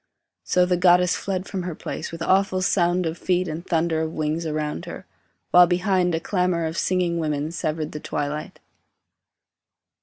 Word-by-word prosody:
So 180 Hz, 0 st, +3 dB
the 180 Hz, 0 st, +1 dB
goddess 180 Hz, 0 st, +4 dB
fled 190 Hz, -2 st, -3 dB
from 190 Hz, -2 st, -4 dB
her 175 Hz, -2 st, -5 dB
place, -, -, -6 dB
with 165 Hz, 0 st, -5 dB
awful 190 Hz, 0 st, +2 dB
Sound 175 Hz, -1 st, +2 dB
of 160 Hz, +1 st, -3 dB
feet 180 Hz, 0 st, 0 dB
and 160 Hz, +1 st, -5 dB
thunder 165 Hz, -2 st, 0 dB
of 160 Hz, 0 st, -3 dB
wings 155 Hz, +2 st, -2 dB
around 150 Hz, -, -3 dB
her; -, -, -8 dB, 0.5 s
While 180 Hz, 0 st, +8 dB
behind 180 Hz, -1 st, +1 dB
a -, -, -1 dB
clamour 180 Hz, -2 st, 0 dB
of 160 Hz, 0 st, -3 dB
singing 180 Hz, -2 st, 0 dB
women 150 Hz, -1 st, -2 dB
Severed 155 Hz, -2 st, -3 dB
the 150 Hz, -, -6 dB
twilight. 145 Hz, +1 st, -4 dB
170 Hz, 170 wpm, -23 LUFS, 160-180 Hz, 0.5 s, While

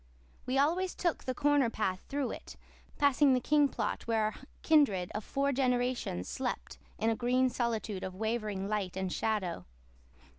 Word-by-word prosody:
We 255 Hz, +1 st, +1 dB
always 345 Hz, +6 st, +2 dB
took 345 Hz, -3 st, -1 dB
the 255 Hz, -1 st, -2 dB
corner 290 Hz, -4 st, +3 dB
path 190 Hz, -5 st, -1 dB
through 280 Hz, -2 st, -1 dB
it, -, -, -9 dB, 0.4 s
passing 280 Hz, -1 st, +4 dB
the -, -, +2 dB
King 290 Hz, +2 st, +3 dB
plot 225 Hz, -3 st, -3 dB
where 225 Hz, -1 st, +2 dB
our 215 Hz, 0 st, 0 dB, 0.3 s
kindred 260 Hz, -, +3 dB
of 210 Hz, -, -3 dB
four 280 Hz, +5 st, 0 dB
generations 245 Hz, -, 0 dB
slept 60 Hz, -7 st, -4 dB, 0.2 s
in 225 Hz, +1 st, +1 dB
a -, -, 0 dB
green 250 Hz, +2 st, +2 dB
solitude 225 Hz, -5 st, -2 dB
of 185 Hz, -1 st, -5 dB
wavering 215 Hz, -2 st, -2 dB
light 200 Hz, -4 st, -2 dB
and 190 Hz, -1 st, -2 dB
shadow. 205 Hz, -, -2 dB
240 Hz, 160 wpm, -32 LUFS, 210-275 Hz, 0.4 s, passing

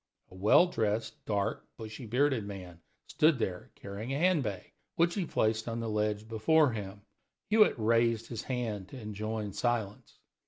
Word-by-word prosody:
A -, -, -13 dB
well 105 Hz, -, +6 dB
dressed, 110 Hz, -, -2 dB
dark, 105 Hz, +1 st, -1 dB
bushy 110 Hz, +2 st, -8 dB
bearded 130 Hz, 0 st, +2 dB
man 90 Hz, -4 st, -9 dB, 0.2 s
stood 155 Hz, -2 st, +3 dB
there 95 Hz, -6 st, -3 dB
carrying 100 Hz, +5 st, -6 dB
a 135 Hz, -, 0 dB
hand 180 Hz, 0 st, +3 dB
bag, 100 Hz, -6 st, -5 dB, 0.2 s
which 170 Hz, +1 st, +3 dB
he 190 Hz, -5 st, -2 dB
placed 110 Hz, +1 st, 0 dB
on 115 Hz, 0 st, -3 dB
the 115 Hz, -1 st, -3 dB
ledge 105 Hz, 0 st, -1 dB
before 130 Hz, +7 st, +3 dB
him. 100 Hz, -2 st, -6 dB, 0.5 s
Hewitt 215 Hz, -8 st, +5 dB
raised 115 Hz, 0 st, +2 dB
his 115 Hz, -2 st, -5 dB
hand 110 Hz, -7 st, -3 dB
to 130 Hz, -, -9 dB
enjoin 105 Hz, -1 st, -4 dB
silence. 110 Hz, -4 st, -2 dB
110 Hz, 160 wpm, -31 LUFS, 105-125 Hz, 0.5 s, well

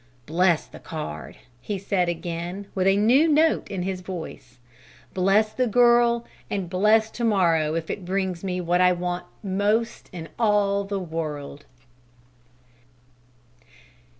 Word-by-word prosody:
"Bless 170 Hz, +2 st, +2 dB
the -, -, -13 dB
card!" 150 Hz, -, -7 dB, 0.2 s
he 205 Hz, +6 st, -3 dB
said 185 Hz, -2 st, 0 dB
again, 175 Hz, +3 st, -4 dB
with 190 Hz, -1 st, +1 dB
a 195 Hz, +1 st, +4 dB
new 250 Hz, +10 st, +4 dB
note 315 Hz, +1 st, +2 dB
in 190 Hz, -3 st, -3 dB
his 185 Hz, 0 st, -3 dB
voice: 180 Hz, -8 st, -8 dB, 0.6 s
"Bless 200 Hz, +4 st, +2 dB
the 255 Hz, +2 st, +1 dB
girl! 235 Hz, 0 st, +4 dB, 0.2 s
And 190 Hz, -4 st, -3 dB
bless 215 Hz, +4 st, +3 dB
to 240 Hz, -, -5 dB
morrow 165 Hz, -8 st, +2 dB
if 165 Hz, -1 st, -3 dB
it 200 Hz, -, -5 dB
brings 185 Hz, -1 st, -2 dB
me 180 Hz, -1 st, -2 dB
what 175 Hz, +1 st, +1 dB
I 180 Hz, 0 st, +5 dB
want 175 Hz, 0 st, -3 dB, 0.2 s
most 210 Hz, +4 st, -1 dB
in 165 Hz, -3 st, -8 dB
all 205 Hz, -3 st, +2 dB
the 200 Hz, 0 st, -3 dB
world!" 155 Hz, -5 st, -5 dB
190 Hz, 135 wpm, -24 LUFS, 175-210 Hz, 0.6 s, I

